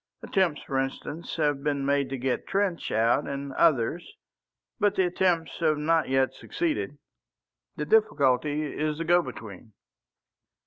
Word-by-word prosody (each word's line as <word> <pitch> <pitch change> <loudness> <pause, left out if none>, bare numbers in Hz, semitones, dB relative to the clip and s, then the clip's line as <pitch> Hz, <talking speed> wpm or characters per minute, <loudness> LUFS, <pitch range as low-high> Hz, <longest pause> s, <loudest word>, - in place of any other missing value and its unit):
Attempts, 185 -6 0
for 135 -1 -1
instance, 135 +4 -4
have 145 -3 0
been 140 -1 -1
made 140 -1 +1
to 135 - -3
get 130 0 -2
Trench 195 -3 -1
out 115 +6 +2
and 140 0 -5
others, 155 +2 +1 0.6
but 205 -2 +2
the 190 - +3
attempts 175 -2 0
have 155 -3 +2
not 160 +1 +1
yet 135 0 +2
succeeded. 310 - -3 0.8
The 150 - -3
difficulty 150 - +2
is 150 0 -2
the 165 - -2
go 175 +2 +5
between." 110 - -10
150 Hz, 140 wpm, -27 LUFS, 135-170 Hz, 0.8 s, go